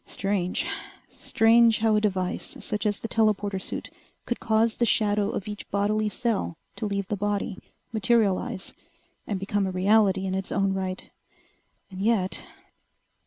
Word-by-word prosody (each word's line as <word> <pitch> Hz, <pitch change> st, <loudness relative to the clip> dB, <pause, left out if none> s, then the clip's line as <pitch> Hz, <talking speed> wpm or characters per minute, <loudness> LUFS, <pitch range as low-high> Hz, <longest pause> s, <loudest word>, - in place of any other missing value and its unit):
Strange. 195 Hz, -2 st, -1 dB, 0.4 s
Strange 225 Hz, 0 st, +4 dB
how 220 Hz, -1 st, +2 dB
a 210 Hz, -, +3 dB
device 190 Hz, -2 st, -1 dB
such 210 Hz, -1 st, 0 dB
as 205 Hz, -1 st, 0 dB
the -, -, -3 dB
telporter 205 Hz, -3 st, +1 dB
suit -, -, -5 dB, 0.3 s
could 240 Hz, -, -2 dB
cause 220 Hz, 0 st, +2 dB
the 240 Hz, -, +2 dB
shadow 210 Hz, -2 st, +2 dB
of 200 Hz, -, -4 dB
each 210 Hz, -1 st, -7 dB
bodily 210 Hz, +2 st, +1 dB
cell 210 Hz, -7 st, -1 dB, 0.2 s
to 215 Hz, -, -3 dB
leave 200 Hz, -1 st, -2 dB
the 210 Hz, -, -1 dB
body, 205 Hz, 0 st, -2 dB, 0.3 s
materialize, 220 Hz, -2 st, +1 dB, 0.5 s
and 200 Hz, -3 st, -2 dB
become 195 Hz, 0 st, 0 dB
a -, -, -2 dB
reality 195 Hz, 0 st, +3 dB
in 190 Hz, -, -2 dB
its 190 Hz, 0 st, -3 dB
own 195 Hz, 0 st, +1 dB
right. 190 Hz, -1 st, -4 dB, 0.8 s
And 190 Hz, 0 st, -7 dB
yet 205 Hz, -3 st, +2 dB
205 Hz, 150 wpm, -26 LUFS, 190-220 Hz, 0.8 s, Strange